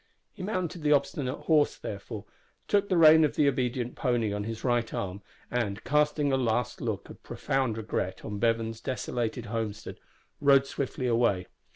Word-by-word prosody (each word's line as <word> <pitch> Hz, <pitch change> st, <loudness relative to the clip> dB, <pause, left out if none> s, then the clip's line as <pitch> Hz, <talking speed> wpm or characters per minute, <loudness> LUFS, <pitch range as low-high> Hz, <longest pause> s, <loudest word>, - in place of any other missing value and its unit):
He -, -, -10 dB
mounted 185 Hz, -3 st, -3 dB
the 150 Hz, 0 st, +4 dB
obstinate 140 Hz, -1 st, -1 dB
horse, 155 Hz, -2 st, +3 dB
therefore, -, -, -7 dB, 0.4 s
took 200 Hz, -1 st, +2 dB
the 185 Hz, -, +2 dB
rein 160 Hz, -1 st, +8 dB
of 150 Hz, -, +1 dB
the 145 Hz, -, +3 dB
obedient 125 Hz, -2 st, -1 dB
pony 120 Hz, -5 st, 0 dB
on 105 Hz, 0 st, -3 dB
his 115 Hz, 0 st, -5 dB
right 120 Hz, -2 st, +1 dB
arm, 95 Hz, +1 st, -4 dB, 0.3 s
and, 110 Hz, -4 st, -2 dB
casting 150 Hz, -1 st, +2 dB
a -, -, +3 dB
last 120 Hz, -2 st, -1 dB
look -, -, -3 dB
of -, -, -14 dB
profound 130 Hz, -5 st, -1 dB
regret 105 Hz, -4 st, -3 dB
on 105 Hz, -2 st, -4 dB
Bevan's 115 Hz, 0 st, 0 dB
desolated 120 Hz, -2 st, -3 dB
homestead, 110 Hz, -1 st, -4 dB, 0.4 s
rode 140 Hz, -1 st, +5 dB
swiftly 135 Hz, -1 st, -3 dB
away. 115 Hz, -6 st, +2 dB
125 Hz, 165 wpm, -28 LUFS, 115-145 Hz, 0.4 s, rein